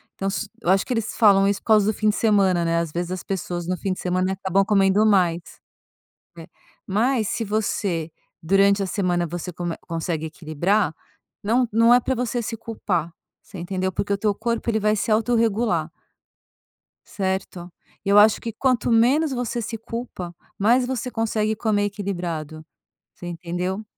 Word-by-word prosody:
Então, 195 - -2
se 205 +2 -3
eu 175 - -2
acho 190 +1 +3
que 255 - -2
eles 225 -2 -2
falam 200 -3 +5
isso 200 0 0
por - - -25
causa 215 -2 +5
do - - -7
fim 215 - +2
de 210 - 0
semana, 195 -6 +2
né, 165 0 +1
ás 170 -2 -3
vezes, 175 +2 -3
as 185 -1 -4
pessoas, 175 -2 -4
no 180 0 -1
fim 190 +2 -2
de - - -9
semana, 185 +1 -1 0.3
comem 195 -3 +4
mais, 180 -5 +3 1.0
né, 165 - -9 0.4
mas 220 +3 +1
se 230 - -2
você 200 -6 -1 0.3
durante 195 +3 +3
a - - -1
semana, 180 -3 0
você 175 +2 -5
come 175 -1 -4
consegue 165 -1 -3
equilibrar, 165 +4 0 0.5
não 240 +4 +2
não 230 +2 +5
é 245 - +6
para 260 +2 -1
você 245 0 -2
se 225 0 -4
culpar, 200 -7 -3 0.3
você 200 - -12
entendeu, 185 +2 -2
porque 200 +3 -2
o 200 - 0
teu 210 0 +1
corpo, 235 +1 -2
ele 220 -1 +1
vai 210 0 +2
se 215 - -2
autorregular. 220 -6 +1 1.1
Certo, 190 -2 -4 0.4
e - - -1
eu 200 - +5
acho 210 +1 +6
que 230 - -5
quanto 250 0 +1
menos 270 +7 +3
você 245 -1 -2
se 225 +1 -5
culpa, 225 -6 -6 0.2
mais 240 +5 +3
você 255 -1 -3
consegue 220 -1 0
comer 215 -2 0
equilibrado, 175 -6 -4 0.5
você 175 - -10
entendeu. 180 +4 -4
200 Hz, 175 wpm, -23 LUFS, 175-225 Hz, 1.1 s, é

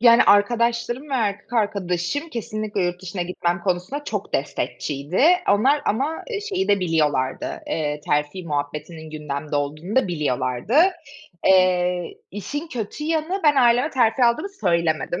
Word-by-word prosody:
Yani, 235 0 +7
arkadaşlarım 235 +6 +2
ve - - 0
erkek 210 -2 -2
arkadaşım, 200 - -1
kesinlikle 215 -5 -3
yurt 175 +1 -3
dışına 180 0 -4
gitmem 175 0 -2
konusunda 185 +11 -2
çok - - -4
destekçiydi 145 - -1 0.3
onlar 265 +9 +3
ama, 280 +9 -1
eee, 420 -3 -2
şeyi 390 -3 -2
de 200 -1 +3
biliyorlardı, 150 -6 0
eee, 150 -2 -2
terfi 150 +5 -1
muhabbetinin 150 +1 -4
gündemde 150 -1 -4
olduğunu 155 - -3
da 260 - +3
biliyorlardı. 150 - -1 0.7
Eee, 180 -2 +3 0.2
işin 285 - -5
kötü 245 +3 -5
yanı, 325 +4 -1
ben 295 -2 +5
aileme 245 +3 +4
terfi 245 -1 +3
aldığımı 240 +12 +2
söylemedim. 170 - 0
195 Hz, 135 wpm, -22 LUFS, 165-245 Hz, 0.7 s, Yani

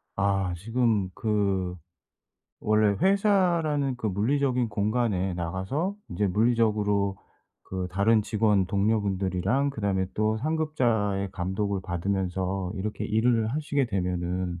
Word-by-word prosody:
아. 95 -2 +1
지금 110 -2 0
그 100 -4 0 0.9
원래 105 -1 +2
회사라는 175 -9 +2
그 115 - -3
물리적인 125 +4 +1
공간에 105 -3 0
나가서 95 - -2
인제 95 +3 -1
물리적으로 105 -2 +1 0.5
그 95 -1 -4
다른 105 +3 +3
직원 105 -3 +2
동료분들이랑 100 +5 0
그다음에 100 -6 -1
또 110 +1 +1
상급자의 120 -10 0
감독을 95 +2 -2
받으면서 95 +1 -2
이렇게 105 +2 -4
일을 110 0 +2
하시게 145 0 0
되면은 90 -2 -2
105 Hz, 270 characters per minute, -27 LUFS, 95-120 Hz, 0.9 s, 다른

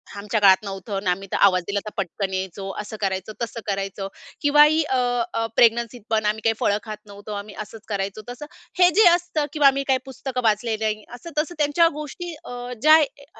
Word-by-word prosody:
आमच्या 210 +2 -2
काळात 195 0 +6
नव्हतं. 195 0 -6
आणि 195 -1 -1
आम्ही 195 +2 -2
तर - - 0
आवाज 185 -2 +3
दिला 200 0 0
तर - - -4
पटकन 195 0 -3
यायचो, 190 +1 -4
असं 210 +1 -8
करायचो, 190 +1 -2
तसं 230 0 -4
करायचो 195 -1 -3 0.3
किंवा 295 0 +6
ही 310 +2 +4
अ, 265 -3 -1 0.4
अ, 225 0 0
प्रेग्नन्सीत 235 +1 +3
पण 220 -1 +1
आम्ही 215 +1 0
काही 225 - +3
फळं 205 - +2
खात 215 -2 -6
नव्हतो. 205 +1 -11
आम्ही 205 0 -7
असंच 215 +1 -10
करायचो 200 0 -3
तसं 245 +4 -7 0.3
हे 360 -1 +7
जे 435 - +8
असतं 345 -3 +1
किंवा 295 -3 +5
आम्ही 275 0 +3
काही 265 -1 +3
पुस्तकं 265 -1 -5
वाचले 220 +1 +1
नाही. 215 -1 -1
असं, 245 +8 -10
तसं 315 +3 -1
त्यांच्या 300 +3 +3
गोष्टी 305 +4 -6
अ - - -9 0.3
ज्या 310 +3 +8
ये 285 -1 -4
220 Hz, 205 wpm, -23 LUFS, 200-285 Hz, 0.4 s, जे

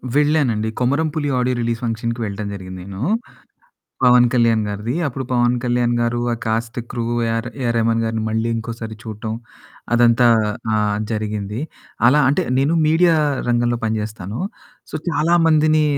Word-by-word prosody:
వెళ్ళానండి. 145 -7 +2
'కొమరం 140 +6 +1
పులి' 145 -2 -1
audio 125 0 +1
release 115 -1 -1
ఫంక్షన్‌కి 115 +1 -2
వెళ్ళటం 100 0 -4
జరిగింది 95 -1 -8
నేను. 100 +1 -8 1.0
'పవన్ 125 -1 +6
కళ్యాణ్' 115 -3 +3
గారిది 105 +4 -3
అప్పుడు 135 -1 -3
'పవన్ 120 0 +3
కళ్యాణ్' 120 -1 +1
గారు 120 0 0
ఆ‌ - - -2
కాస్ట్ 115 +1 -2
క్రూ 120 -1 -3 0.3
ఏర్ 115 +1 -2
ఏఆర్ 120 -2 0
రెహమాన్ 115 0 +2
గారిని 110 0 -2
మళ్ళీ 110 +1 -1
ఇంకోసారి 115 -1 -5
చూడటం 110 -1 -5 0.6
అదంతా 120 0 +5 0.5
ఆహ్, 105 -1 +1
జరిగింది. 105 0 -3 0.5
అలా 145 +5 +5
అంటే 175 +6 +1 0.2
నేను 140 +4 +2
మీడియా 165 +2 +4 0.3
రంగంలో 120 0 +1
పని 110 0 0
చేస్తాను. 105 -1 -6 0.5
సో - - -5
చాలా 165 +1 +1
మందిని 155 0 +4
115 Hz, 145 wpm, -20 LUFS, 110-125 Hz, 1.0 s, పవన్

